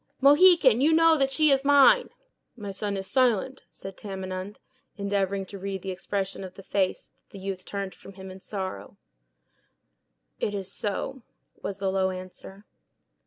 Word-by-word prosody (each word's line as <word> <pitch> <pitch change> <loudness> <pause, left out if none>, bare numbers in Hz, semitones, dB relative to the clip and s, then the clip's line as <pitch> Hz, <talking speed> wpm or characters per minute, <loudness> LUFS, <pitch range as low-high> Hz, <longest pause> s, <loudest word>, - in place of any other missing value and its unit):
"Mohican, 290 -3 +6
you 310 +3 +4
know 330 0 +6
that 270 -3 +2
she 305 +2 +3
is 270 0 +3
mine." 285 - +6 0.5
"My 205 -4 -6
son 200 +1 -3
is 190 - -5
silent," 255 +1 +1
said 195 0 -10
Tamenund, 190 0 -6 0.4
endeavoring 200 -1 -1
to 195 +1 -10
read 195 -1 -5
the 190 - -3
expression 195 +1 -4
of 185 -1 -9
the 195 - -12
face 190 -1 -1
that - - -46
the - - -8
youth 190 -1 -5
turned 200 -1 -5
from 195 - -14
him 190 0 -10
in 190 - -11
sorrow. 190 - -6 1.4
"It 205 - -1
is 195 -1 -6
so," 245 +6 -3 0.4
was 195 - -4
the 195 -1 -1
low 190 0 +1
answer. 185 +2 -9
200 Hz, 165 wpm, -26 LUFS, 190-260 Hz, 1.4 s, Mohican